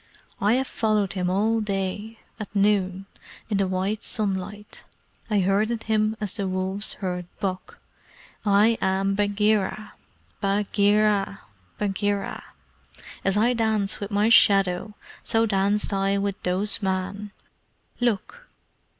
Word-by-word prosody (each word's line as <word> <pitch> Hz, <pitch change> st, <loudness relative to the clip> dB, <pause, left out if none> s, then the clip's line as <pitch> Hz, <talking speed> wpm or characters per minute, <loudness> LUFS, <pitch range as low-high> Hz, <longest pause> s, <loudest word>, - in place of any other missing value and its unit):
I 205 Hz, +3 st, +3 dB
have 260 Hz, +2 st, +1 dB
followed 215 Hz, -5 st, 0 dB
him 180 Hz, -2 st, -1 dB
all 220 Hz, +4 st, +1 dB
day 205 Hz, +2 st, -3 dB, 0.2 s
at 210 Hz, 0 st, -8 dB
noon 195 Hz, -2 st, +1 dB, 0.5 s
in 205 Hz, -, +2 dB
the 195 Hz, -, +2 dB
white 190 Hz, +3 st, -1 dB
sunlight. 205 Hz, 0 st, -4 dB, 0.5 s
I 210 Hz, -2 st, +2 dB
herded 215 Hz, +5 st, +1 dB
him 215 Hz, 0 st, +1 dB
as 210 Hz, 0 st, -2 dB
the 200 Hz, -2 st, -1 dB
wolves 190 Hz, +2 st, 0 dB
herd 180 Hz, -1 st, -3 dB
buck. 190 Hz, -3 st, -4 dB, 0.7 s
I 210 Hz, +2 st, +4 dB
am 195 Hz, +1 st, +1 dB
Bagheera! 205 Hz, 0 st, 0 dB, 0.5 s
Bagheera! 205 Hz, 0 st, +2 dB, 0.4 s
Bagheera! 205 Hz, 0 st, -2 dB, 0.8 s
As 195 Hz, +1 st, +1 dB
I 235 Hz, +4 st, +3 dB
dance 220 Hz, -4 st, 0 dB
with 200 Hz, -, -5 dB
my 205 Hz, +1 st, +2 dB
shadow, 195 Hz, -2 st, +4 dB, 0.3 s
so 225 Hz, 0 st, +2 dB
danced 205 Hz, 0 st, +1 dB
I 195 Hz, 0 st, +1 dB
with 200 Hz, -1 st, -2 dB
those 190 Hz, +5 st, 0 dB
men. 195 Hz, +2 st, -3 dB, 0.7 s
Look!" 245 Hz, -, -2 dB
205 Hz, 120 wpm, -25 LUFS, 195-215 Hz, 0.8 s, I